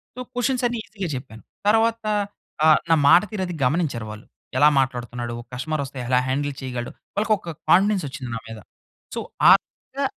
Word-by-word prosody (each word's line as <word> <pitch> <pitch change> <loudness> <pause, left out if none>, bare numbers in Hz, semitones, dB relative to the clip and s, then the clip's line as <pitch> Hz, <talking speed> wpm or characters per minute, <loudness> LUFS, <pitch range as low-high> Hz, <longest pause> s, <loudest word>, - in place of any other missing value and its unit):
So, - - -9
questions 250 +1 0
అన్నీ 240 0 -3
ఈజీగా 200 -4 -5
చెప్పాను. 110 -5 -11 0.3
తర్వాత 225 +1 +2 0.6
ఆహ్, 155 -1 +7
నా 165 - +6
మాట 175 - +8
తీరది 190 -4 -3
గమనించారు 135 -5 0
వాళ్ళు. 105 +1 -10 0.3
ఎలా 145 +3 +7
మాట్లాడుతున్నాడు? 120 -2 -2
ఒక 120 - -17
కస్టమరొస్తే, 140 +1 -3
ఎలా 125 0 +3
హ్యాండిల్ 145 +2 -1
చేయగలడు, 125 -2 -4 0.2
వాళ్ళకొక 205 -4 0 0.2
కాన్ఫిడెన్సొచ్చింది 170 - +2
నా - - -3
మీద. 115 -1 -8 0.6
సో, - - -2 0.3
ఆ - - +12
విధంగా - - -6
145 Hz, 155 wpm, -23 LUFS, 125-200 Hz, 0.6 s, ఆ